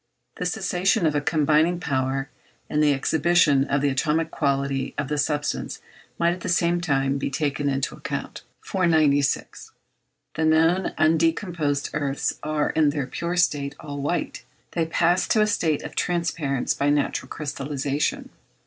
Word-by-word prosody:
The 180 - -1
cessation 190 +1 +1
of 155 - +2
a 145 - +1
combining 155 +3 +2
power, 135 -3 -1 0.4
and 150 - +2
the 150 -1 +4
exhibition 145 0 +3
of 140 0 0
the 145 - +2
atomic 155 +4 0
quality 140 -2 -1
of 145 -1 -2
the 150 - -1
substance 145 0 -2 0.4
might 170 0 +2
at 180 - -7
the 185 - -4
same 175 0 +2
time 135 -4 0
be - - -2
taken 145 0 -1
into 135 -1 -1
the - - -12
account. - - -5 0.2
496. 155 -6 +1 0.6
The 160 - -1
known 165 +4 +3
undecomposed 160 -2 +1
earths 140 -2 -2
are, 150 -1 0
in 155 -2 +3
their 145 -2 -2
pure 170 +6 -3
state, 145 -4 +1
all 145 -2 -6
white. 145 -4 -2 0.3
They 165 -2 -1
pass 175 +2 +2
to 215 - +3
a - - +5
state 165 -8 0
of - - -8
transparence 165 -6 -1
by 140 - 0
natural 145 0 0
crystallization. 145 -1 -3
150 Hz, 155 wpm, -24 LUFS, 140-170 Hz, 0.6 s, a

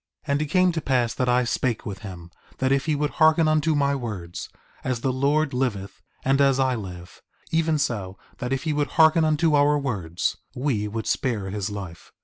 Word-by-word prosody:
4:32 145 - -2
And 140 +1 +1
it - - 0
came 180 +4 +3
to 165 -1 -3
pass 125 -5 +1
that 125 -1 0
I 125 +1 +3
spake 120 -1 -1
with 100 -4 -5
him, 90 -5 -9 0.3
that 130 0 0
if 135 +2 +1
he 155 - +2
would 150 0 -1
hearken 160 0 +4
unto 155 0 +2
my 140 -1 +2
words, 105 -10 -5 0.3
as 125 -2 -2
the 130 0 0
Lord 140 +3 +1
liveth, 105 -7 -2 0.2
and 135 +1 +3
as 135 -1 +4
I 130 -1 +2
live, 90 -6 -8 0.3
even 160 -1 +2
so 100 -9 -2 0.2
that 125 0 -3
if 135 -1 -1
he 155 -2 0
would 145 0 -1
hearken 160 0 +6
unto 155 0 +2
our 145 0 +4
words, 100 - -2 0.2
we 125 -6 -1
would 110 +2 -4
spare 105 -7 -1
his 100 0 -3
life. 95 -5 -8
130 Hz, 205 wpm, -24 LUFS, 105-150 Hz, 0.3 s, hearken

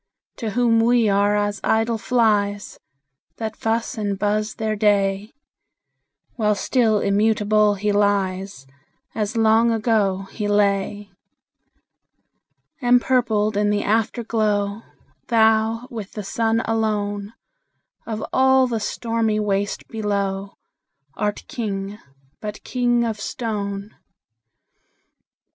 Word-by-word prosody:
To 225 - -3
whom 235 -2 +4
we 235 0 +3
are 200 +1 +2
as 205 0 -1
idle 225 0 +1
flies, 205 -4 0 0.6
That 220 -1 -4
fuss 225 0 -2
and 200 -2 -2
buzz 210 +1 -1
their 220 -1 -2
day; 205 0 +1 1.1
While 210 -2 +2
still 220 0 +2
immutable 210 0 +2
he 205 +1 -1
lies, 195 -6 0 0.5
As 215 +1 -2
long 225 +1 +4
ago 215 -4 +1
he 210 -2 -3
lay. 205 0 0 1.7
Empurpled 240 -4 +2
in 205 0 +2
the 205 0 0
Afterglow, 215 -2 0 0.5
Thou, 225 +1 +2
with 215 -4 -7
the 210 - -5
Sun 225 +3 0
alone, 210 -2 -1 0.7
Of 220 -1 -4
all 265 0 +4
the 235 -3 -2
stormy 225 0 -1
waste 205 -1 -1
below, 200 -2 -2 0.6
Art 210 +4 -2
King, 205 -3 -4 0.4
but 210 0 -7
king 240 -1 +1
of 225 -2 -2
stone! 205 -3 -4
215 Hz, 105 wpm, -22 LUFS, 205-225 Hz, 1.7 s, whom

